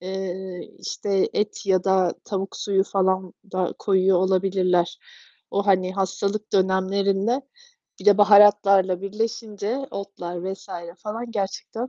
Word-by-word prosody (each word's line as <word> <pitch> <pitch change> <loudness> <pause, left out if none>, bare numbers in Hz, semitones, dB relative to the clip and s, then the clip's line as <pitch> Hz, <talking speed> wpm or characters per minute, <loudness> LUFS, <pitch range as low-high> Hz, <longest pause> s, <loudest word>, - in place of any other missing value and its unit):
eee, 190 0 -6
işte, 195 -2 -1
et 210 0 -2
ya 185 -2 +2
da 190 -2 +2
tavuk 195 -1 -4
suyu 195 -1 +1
falan 190 -2 0 0.2
da 185 -1 -1
koyuyor 190 -2 +3
olabilirler. 185 -2 +1 0.5
O, 200 +1 -1
hani, 185 -2 +2
hastalık 200 +2 -2
dönemlerinde 195 +5 +1 0.6
bir - - -10
de 205 0 +6
baharatlarla 200 -3 +6
birleşince, 215 +2 -3
otlar 185 -2 -5
vs. 195 - -18 0.3
falan 225 +3 -6
gerçekten 225 +3 -4
195 Hz, 115 wpm, -23 LUFS, 185-205 Hz, 0.6 s, de